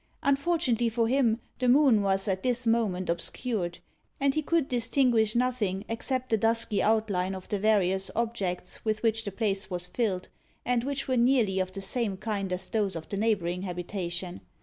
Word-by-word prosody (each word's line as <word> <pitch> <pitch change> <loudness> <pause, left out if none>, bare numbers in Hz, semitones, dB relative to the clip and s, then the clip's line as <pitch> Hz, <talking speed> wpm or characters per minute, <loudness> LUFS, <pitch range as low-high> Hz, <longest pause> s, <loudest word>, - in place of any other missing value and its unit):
Unfortunately 280 -5 +2
for 230 0 +1
him, 240 -3 +2 0.2
the 250 -1 +2
moon 260 -5 +5
was 195 0 0
at 190 -1 0
this 250 -1 0
moment 215 -6 +1
obscured, 175 +1 -2 0.4
and 275 0 +2
he 310 - 0
could 315 -1 +1
distinguish 235 -2 +2
nothing 230 -6 0
except 255 +2 -3
the 225 - +4
dusky 225 -1 +1
outline 200 -4 +1
of 185 - -9
the 205 - -1
various 195 -2 +2
objects 200 -6 -3
with 215 0 -1
which 225 -1 +1
the 200 - -3
place 195 -1 -1
was 180 -1 -2
filled, 190 -3 -1 0.4
and 245 -1 +1
which 275 +1 -3
were 260 -1 +1
nearly 235 -6 +3
of 185 0 -1
the 195 - -5
same 200 0 -2
kind 200 -2 -3
as 180 +1 0
those 205 -4 0
of 160 -1 -7
the 200 - -3
neighbouring 195 -5 0
habitation. 175 - -4
220 Hz, 175 wpm, -28 LUFS, 190-240 Hz, 0.4 s, moon